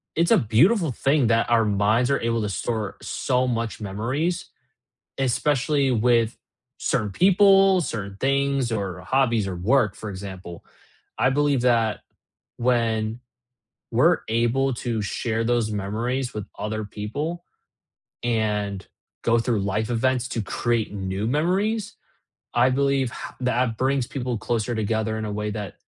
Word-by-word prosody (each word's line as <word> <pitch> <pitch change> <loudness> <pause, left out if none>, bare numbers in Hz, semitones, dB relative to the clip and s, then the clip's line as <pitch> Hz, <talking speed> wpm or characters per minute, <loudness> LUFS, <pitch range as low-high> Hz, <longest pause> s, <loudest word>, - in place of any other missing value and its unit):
it's 170 +1 +2
a - - +7
beautiful 155 - +3
thing 135 +1 +2
that 115 0 +2
our 115 -2 +4
minds 105 +5 +2
are 140 - +1
able 115 0 0
to 105 - -1
store 110 +1 -3
so 130 0 0
much 115 -2 -2
memories, 130 - -2 0.7
especially 135 +2 +1
with 115 -1 +2 0.4
certain 105 -2 0
people, 195 - +5
certain 100 -8 -5
things, 140 -1 +1
or 100 -5 -3
hobbies 120 -6 +1
or 95 - -4
work, 105 +3 +2
for 110 - -7
example. 95 -3 -8 0.5
I 130 - +3
believe 145 -1 +2
that, 115 -3 +2 0.6
when 115 -2 0 0.7
we're 155 +9 +4
able 120 +4 +1
to 115 -1 -2
share 110 +3 -2
those 120 -2 +1
memories 115 +6 -2
with 105 -1 -5
other 110 0 -3
people, 145 +13 -5 0.8
and 105 -4 -1 0.4
go 115 0 +3
through 115 -2 0
life 105 +3 -1
events 125 +1 +1
to 115 - -2
create 115 +1 -1
new 95 +1 -3
memories, 190 - 0 0.6
I 125 +2 +4
believe 135 -1 +1
how - - -8
that 125 -2 0
brings 130 +1 +1
people 125 -3 -3
closer 120 +1 -1
together 110 0 -1
in 110 - -3
a 105 - -4
way 105 +1 -2
that 105 -3 -5
115 Hz, 140 wpm, -24 LUFS, 105-135 Hz, 0.8 s, a